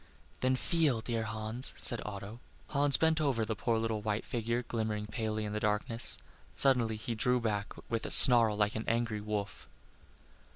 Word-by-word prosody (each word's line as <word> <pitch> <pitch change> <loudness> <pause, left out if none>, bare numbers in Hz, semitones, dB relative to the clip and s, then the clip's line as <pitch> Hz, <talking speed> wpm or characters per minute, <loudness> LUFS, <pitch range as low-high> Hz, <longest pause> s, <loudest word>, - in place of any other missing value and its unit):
"Then 130 0 0
feel, 145 -4 -1
dear 115 -1 -4
Hans," 110 +3 -5
said 120 - +4
Otto. 105 +2 -9 0.3
Hans 140 -1 +3
bent 160 0 +1
over 130 -7 -1
the 110 0 -4
poor 115 +2 -2
little 110 -1 -3
white 105 0 -4
figure 120 0 -3
glimmering 110 -3 -4
palely 110 0 -4
in 105 - -6
the 105 - -3
darkness. 105 +3 -1 0.4
Suddenly 125 -5 +4
he 110 +2 -6
drew 125 +2 0
back 105 -3 -4 0.2
with 115 -1 -4
a - - -7
snarl 115 -4 +8
like 105 0 0
an 110 - -5
angry 115 -2 -2
wolf. 105 -1 -6
115 Hz, 170 wpm, -30 LUFS, 105-120 Hz, 0.4 s, snarl